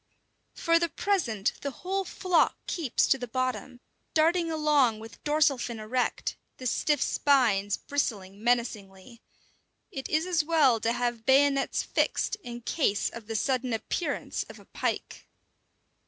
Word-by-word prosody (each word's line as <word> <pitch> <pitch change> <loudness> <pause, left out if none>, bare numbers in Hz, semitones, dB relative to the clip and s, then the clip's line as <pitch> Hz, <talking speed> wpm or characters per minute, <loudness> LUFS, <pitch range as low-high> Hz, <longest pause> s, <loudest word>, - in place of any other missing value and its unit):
For 335 -1 +3
the 340 0 0
present 270 - 0
the 280 - -2
whole 380 +7 -3
flock 365 -1 +2
keeps 310 -9 0
to 270 - +2
the 245 - -5
bottom, 255 0 -3 0.4
darting 330 +2 +3
along 300 -7 +3
with 220 +1 -12
dorsal 295 -3 +3
fin 235 -1 -4
erect, 245 +4 -1 0.2
the 255 - -9
stiff 295 +4 +1
spines 220 -8 +2
bristling 205 -8 -3
menacingly. 230 -2 -2 0.7
It 270 - -6
is 315 +2 +1
as 350 -4 +1
well 300 -7 +4
to 225 +1 0
have 240 -2 -2
bayonets 275 +1 +3
fixed - - 0
in 240 - -8
case 230 -5 0
of 230 -2 -10
the 225 - -4
sudden 255 +1 0
appearance 285 +7 -2
of - - -10
a - - -16
pike. - - -4
255 Hz, 140 wpm, -28 LUFS, 225-310 Hz, 0.7 s, well